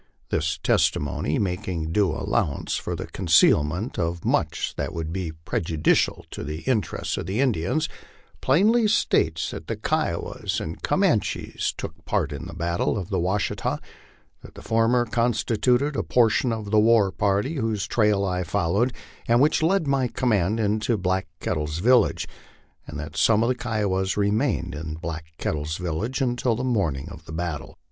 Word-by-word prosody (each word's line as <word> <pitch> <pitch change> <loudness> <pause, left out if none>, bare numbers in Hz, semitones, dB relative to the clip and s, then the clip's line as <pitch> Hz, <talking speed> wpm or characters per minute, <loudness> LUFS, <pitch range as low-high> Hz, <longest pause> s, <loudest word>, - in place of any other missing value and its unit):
This 80 0 0
testimony, 75 +1 +1
making 90 -4 -2
due 100 +1 +3
allowance 70 -1 -1
for - - -3
the - - -5
concealment 85 - +2
of 85 0 -2
much - - 0
that - - -3
would 80 0 -3
be 90 -3 -3
prejudicial 80 -3 +1
to - - -6
the 75 +2 -5
interests 115 -8 -1
of - - -4
the 100 +5 -2
Indians, 130 - +1 0.5
plainly 215 - +4
states 80 - +1
that 80 - -8
the 115 - -2
Kiowas 120 - -2
and - - -6
Comanches - - 0
took - - -7
part - - 0
in - - -6
the - - -9
battle 85 +4 0
of 95 -4 -5
the - - +1
Washita: 95 +4 -1 0.6
that - - -14
the - - -11
former 115 +2 +2
constituted 120 +4 +1
a - - +1
portion 120 +1 +2
of 110 -3 -4
the 110 - +5
war 110 -3 +4
party 105 +12 0
whose 110 -5 -1
trail 105 -3 +2
I 90 -1 -1
followed, 95 +8 0 0.3
and 120 +1 +4
which 150 +4 +3
led 170 +1 +2
my 135 -2 +1
command 110 -4 +1
into 110 +2 +1
Black 95 0 -1
Kettle's 75 0 -2
village: 120 +7 +3 0.6
and - - -6
that 75 +1 -7
some 115 -1 +4
of 115 - +1
the - - +3
Kiowas 105 -7 -1
remained 100 - +1
in 75 +1 -5
Black 80 -1 -5
Kettle's 75 +1 -2
vil 85 -3 -3
lage 125 +6 -2
until 120 -2 +1
the 125 - -3
morning 90 - 0
of 80 +1 -11
the - - -10
battle. 80 -5 -4
100 Hz, 165 wpm, -24 LUFS, 85-120 Hz, 0.6 s, the